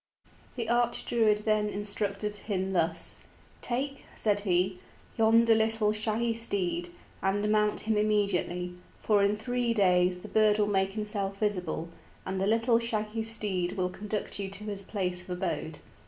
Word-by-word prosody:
The 235 -3 -3
Arch 240 0 +1
Druid 215 -3 +2
then 215 -1 +2
instructed 205 0 -2
him 190 -2 -2
thus: 170 -3 0 0.4
"Take," 275 +3 -2
said 205 -2 +2
he, 185 -1 +1 0.4
"yonder 225 +1 +5
little 220 -1 +2
shaggy 220 +2 0
steed, 180 -6 +1 0.3
and 200 +2 +1
mount 210 0 +2
him 220 -1 0
immediately, 200 -4 0 0.2
for 210 -2 +2
in 200 +1 +3
three 240 +1 -1
days 180 -3 +3
the 180 - -10
bird 215 -1 +3
will 210 - +3
make 195 -1 +1
himself 205 -2 -2
visible, 180 -6 -1 0.4
and 190 0 -2
the 195 - +1
little 230 +2 +3
shaggy 225 -1 -2
steed 210 -5 -1
will 180 -2 -1
conduct 210 +1 -4
you 195 -1 -3
to 200 +2 -5
his 205 -2 -4
place 185 -3 -2
of 180 - -16
abode. 170 -3 -3
210 Hz, 155 wpm, -29 LUFS, 190-220 Hz, 0.4 s, yonder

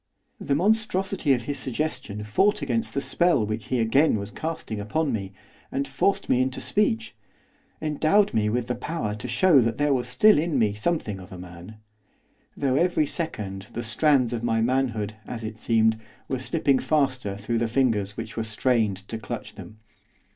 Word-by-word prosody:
The 140 - 0
monstrosity 195 -3 +1
of 120 -2 -1
his 140 +3 -3
suggestion 125 -6 -3
fought 190 - +2
against 115 -4 -1
the 140 - +1
spell 170 -5 +2
which 110 0 -4
he 130 - 0
again 115 +4 +3
was 100 -1 -5
casting 155 -9 -4
upon 145 +10 -1
me, 100 -3 -3 0.4
and 140 +1 -1
forced 200 - 0
me 125 - +3
into 130 0 -1
speech, 115 - 0 0.6
endowed 155 +7 +2
me 105 -1 +2
with 120 +2 0
the 125 - -2
power 150 -7 -3
to 105 +3 -6
show 135 +5 +5
that 115 -1 0
there 145 0 +2
still 125 - +5
was 150 - +2
in 165 -4 -1
me 110 -4 +2
something 105 - -2
of 95 +2 -12
a 95 - -8
man; 90 +3 -10 0.8
though 135 -2 +1
every 175 -1 +2
second 105 - -4
the 120 - -4
strands 125 +1 +2
of 115 - -2
my 115 -1 +1
manhood, 115 -3 0
as 115 -2 -6
it 110 0 -6
seemed, 110 -1 +2 0.3
were 130 - -2
slipping 140 0 +1
faster 130 -9 0
through 115 +3 -2
the 115 - +1
fingers 110 -5 0
which 115 -1 -6
were 115 - -1
strained 110 -3 0
to 115 - -5
clutch - - -6
them. 110 - -11
120 Hz, 180 wpm, -25 LUFS, 110-150 Hz, 0.8 s, show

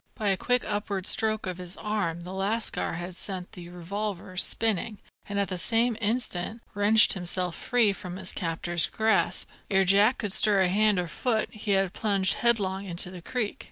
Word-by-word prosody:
By 210 -2 -1
a 195 - +3
quick 245 +5 0
upward 205 -2 -3
stroke 215 0 +1
of 185 -1 -4
his 180 0 -5
arm 200 -6 -2
the 180 +2 -8
lascar 205 +4 -1
had 175 +2 -5
sent 185 -1 -4
the 175 -1 -10
revolver 185 +1 -5
spinning, 215 +2 0 0.3
and 200 0 -1
at 200 - 0
the 185 - -3
same 230 +4 +2
instant 220 -1 -2
wrenched 210 +2 +5
himself 180 -1 -2
free 235 -5 +2
from 185 -2 -8
his 190 -1 +1
captor's 170 0 -1
grasp. 220 0 +1 0.2
Ere 195 -1 +3
Jack 200 +6 +4
could 205 -3 -3
stir 210 -4 +5
hand 205 +2 +3
or 175 -1 -1
foot, 220 +3 -1
he 215 -2 -2
had 195 -2 +1
plunged 195 -3 +1
headlong 200 -6 +1
into 180 0 -2
the 180 -2 -9
creek. 220 +2 -3
200 Hz, 180 wpm, -27 LUFS, 180-215 Hz, 0.3 s, wrenched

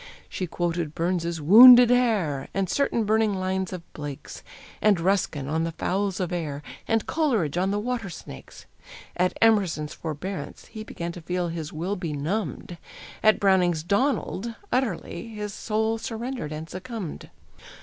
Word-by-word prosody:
She 185 - -4
quoted 170 -2 -2
Burns's 170 -1 -1
"Wounded 240 - +9
Hare," 205 - +1
And 195 -1 0
certain 240 0 +1
burning 215 -1 +2
lines 190 0 -2
of 180 -2 -6
Blake's, 145 -2 -8 0.4
And 210 -4 +4
Ruskin 170 -6 0
on 160 +3 0
the 165 0 -3
fowls 195 +3 -1
of 180 -3 -2
air, 150 -4 -4 0.2
And 225 -1 +1
Coleridge 230 - 0
on 185 +2 +1
the 200 - 0
water 230 -1 -3
snakes. 65 - -11 0.5
At 180 +1 0
Emerson's 190 -9 +2
"Forbearance" 160 0 -6
he 215 -1 -8
Began 170 -5 -5
to 175 - -9
feel 175 +1 -2
his 165 -2 -5
will 175 +6 -3
benumbed; 170 - -4 0.4
At 215 0 +4
Browning's 180 -5 +3
"Donald" 230 - 0 0.2
utterly 230 -6 -2
His 210 -2 -6
soul 220 +2 -1
surrendered 235 - -5
and 155 +1 -6
succumbed. 190 -1 -7
185 Hz, 145 wpm, -25 LUFS, 165-220 Hz, 0.5 s, Wounded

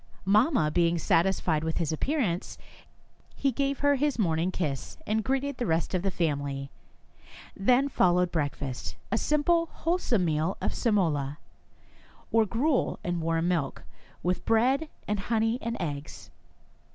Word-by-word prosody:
Mamma 205 - +3
being 170 +1 +2
satisfied 165 -1 +1
with 160 0 -2
his 165 -4 0
appearance, 190 - -1 0.8
he 275 - +1
gave 275 +2 -1
her 285 0 +4
his 290 -1 0
morning 170 -4 +1
kiss, 150 -8 -3
and 220 +1 0
greeted 270 +2 -1
the 240 - -2
rest 165 +3 0
of 185 - +1
the 195 - 0
family. 140 -6 -2 0.8
Then 250 +7 +3
followed 180 -8 +2
breakfast, 140 -5 -3
— - - -30
a 225 - +2
simple, 330 +3 +2
wholesome 320 - 0
meal 160 +3 0
of - - -1
semola, 155 - 0 0.9
or 225 -1 +4
gruel 255 +7 +1
and 175 -1 -2
warm 165 +1 0
milk, 160 -7 -1 0.4
with 180 +1 0
bread 260 +7 +2 0.2
and 210 -1 0
honey 225 +3 0
and 230 0 -3
eggs. 145 -4 -6
185 Hz, 140 wpm, -28 LUFS, 160-250 Hz, 0.9 s, her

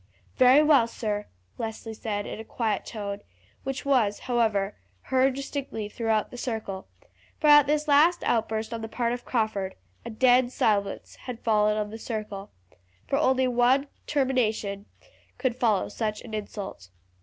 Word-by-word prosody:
"Very 260 +3 +7
well, 285 -6 +5
sir," 210 -3 -3 0.3
Leslie 225 0 -5
said 210 -2 -3
in - - -6
a - - -6
quiet 220 -3 -2
tone, 205 -2 -5 0.4
which 270 +1 -4
was, 235 -7 +2
however, 220 -5 +1 0.3
heard 260 0 +2
distinctly 275 -5 -4
throughout 220 0 -1
the 245 - -8
circle, 215 -6 -4 0.5
for - - -2
at 295 -2 +8
this 300 +1 +1
last 310 +5 +5
outburst 220 0 0
on 230 - -4
the 225 - -4
part 235 0 -1
of 245 - -6
Crawford 215 -5 -1 0.3
a - - -6
dead 245 +2 +4
silence 205 -5 0
had 245 -2 -5
fallen 210 -1 +3
on 210 -1 -2
the 225 - -7
circle, 210 -4 -5 0.6
for - - 0
only 260 0 +3
one 250 +3 +3 0.2
termination 220 -7 0 0.5
could 255 -3 0
follow 220 -6 +2
such 215 -2 -3
an 225 - -10
insult. 205 - -6
225 Hz, 155 wpm, -27 LUFS, 210-255 Hz, 0.6 s, at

